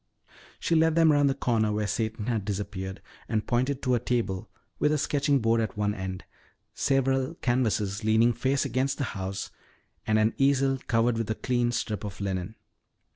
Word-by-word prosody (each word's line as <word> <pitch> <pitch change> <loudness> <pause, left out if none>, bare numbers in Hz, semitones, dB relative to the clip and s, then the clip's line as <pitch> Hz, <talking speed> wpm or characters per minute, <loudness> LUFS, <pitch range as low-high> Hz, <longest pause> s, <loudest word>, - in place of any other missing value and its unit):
She - - 0
led 160 0 +4
them 165 -2 +5
around 145 -1 +4
the 135 - +1
corner 115 -5 +1
where 105 0 -1
Satan 110 0 -2
had 115 -4 -1
disappeared 95 -1 -4 0.3
and 110 -2 0
pointed 130 +3 0
to 125 - +2
a 120 - +3
table 110 -7 -2 0.3
with 150 - +3
a 155 - +2
sketching 145 0 +1
board 115 -2 +2
at 110 -2 -3
one 105 0 +1
end, 95 -2 -5 0.5
several 135 +1 +1
canvases 110 -6 0
leaning 110 +2 +4
face 130 +4 0
against 130 +1 0
the - - -1
house, 95 0 -4 0.6
and 110 - +3
an 110 +1 +3
easel 135 -1 +3
covered 115 0 +2
with 115 - -2
a 110 - 0
clean 120 -1 0
strip 110 -3 -3
of 100 -1 -6
linen. 95 +1 -3
115 Hz, 180 wpm, -27 LUFS, 105-135 Hz, 0.6 s, them